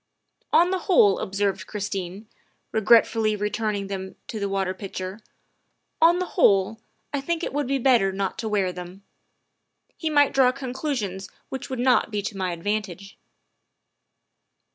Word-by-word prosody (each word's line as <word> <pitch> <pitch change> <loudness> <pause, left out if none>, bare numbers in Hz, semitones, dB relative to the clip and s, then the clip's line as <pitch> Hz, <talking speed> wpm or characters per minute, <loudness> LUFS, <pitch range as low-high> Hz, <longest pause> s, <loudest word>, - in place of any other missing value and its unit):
" - - -54
On 350 +2 +5
the 375 - 0
whole," 205 - +5
observed 195 -1 -2
Christine, 200 -1 -5 0.4
regretfully 220 0 +4
re 210 0 -2
turning 210 -2 -2
them 190 -1 -6
to 220 - -4
the 200 -1 -2
water 195 -1 -1
pitcher, 190 0 -6 0.4
" - - -47
on 335 +2 +6
the 365 - -1
whole, 200 +3 +3 0.3
I 285 - -1
think 335 +3 -2
it - - -3
would 290 -2 -1
be 275 +1 +1
better 240 -7 +3
not 195 +3 -3
to 225 -2 -3
wear 195 -3 0
them. 180 +2 -9 0.9
He 320 - -2
might 290 -2 +4
draw 260 -2 +5
conclusions 250 -8 -4 0.2
which 265 - -6
would 260 - -3
not 250 -1 +3
be 210 -2 -3
to 210 0 -4
my 185 -2 -2
advantage. 195 +2 -4
210 Hz, 160 wpm, -24 LUFS, 195-255 Hz, 0.9 s, on